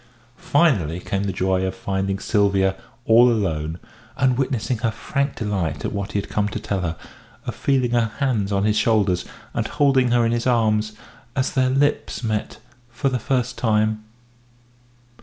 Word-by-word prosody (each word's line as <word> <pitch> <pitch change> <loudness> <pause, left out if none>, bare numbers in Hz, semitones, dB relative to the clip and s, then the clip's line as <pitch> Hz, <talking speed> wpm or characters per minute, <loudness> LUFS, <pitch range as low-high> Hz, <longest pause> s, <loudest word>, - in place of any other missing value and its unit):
Finally 105 - +2
came 100 +2 -2
the 100 - -1
joy 95 0 0
of 95 0 -2
finding 95 0 -2
Sylvia 100 -2 +2 0.3
all 120 +2 +6
alone, 80 -7 -1 0.4
and 130 -2 +3
witnessing 125 -2 -1
her 115 0 +1
frank 140 +5 -2
delight 90 - -2
at - - -2
what 100 -1 -4
he 105 - +1
had - - -5
come 105 -1 0
to 105 - -4
tell 100 -2 -2
her, 85 -2 -2 0.5
of - - -3
feeling 130 -3 +1
her 120 -2 +2
hands 115 -8 0
on 100 0 +1
his 105 0 +2
shoulders, 105 -6 +2 0.3
and - - -1
holding 135 -4 +3
her 120 -1 +3
in 115 - +1
his 120 +1 -1
arms, 110 -3 +2 0.4
as 130 -1 0
their 130 -2 +2
lips 140 0 0
met 110 -2 -2 0.3
for 130 +4 -1
the 125 -1 -1
first 125 +1 -1
time. 110 -1 +1
110 Hz, 170 wpm, -22 LUFS, 100-125 Hz, 0.5 s, all